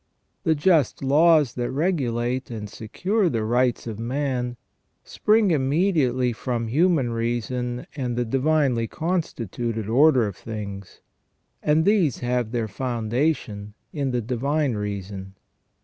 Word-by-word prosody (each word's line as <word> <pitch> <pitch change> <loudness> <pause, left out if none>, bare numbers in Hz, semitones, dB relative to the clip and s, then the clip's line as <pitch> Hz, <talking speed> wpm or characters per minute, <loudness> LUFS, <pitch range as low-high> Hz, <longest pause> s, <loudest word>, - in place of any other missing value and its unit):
The 160 -3 +3
just 150 -3 +2
laws 150 -1 +4
that 120 -1 -2
regulate 130 -5 -1
and 110 -3 -5
secure 180 - -1
the 115 -5 -1
rights 120 +2 +1
of 110 -2 -6
man 125 0 -2 0.5
spring 215 -2 +2
immediately 135 -4 +2
from 115 -1 -3
human 150 -2 +2
reason 120 +1 -2
and 125 -4 -3
the 120 - +1
divinely 135 -2 +1
constituted 120 - -3
order 130 +1 +5
of 100 -3 -4
things, 100 -3 -7 0.6
and 155 +2 +2
these 195 - +3
have 120 -2 0
their 120 -2 -1
founda 120 +6 0
tion 105 -4 -9 0.2
in 140 -3 -1
the 125 -1 0
divine 135 +4 0
reason. 100 -2 -5
125 Hz, 125 wpm, -24 LUFS, 115-150 Hz, 0.6 s, order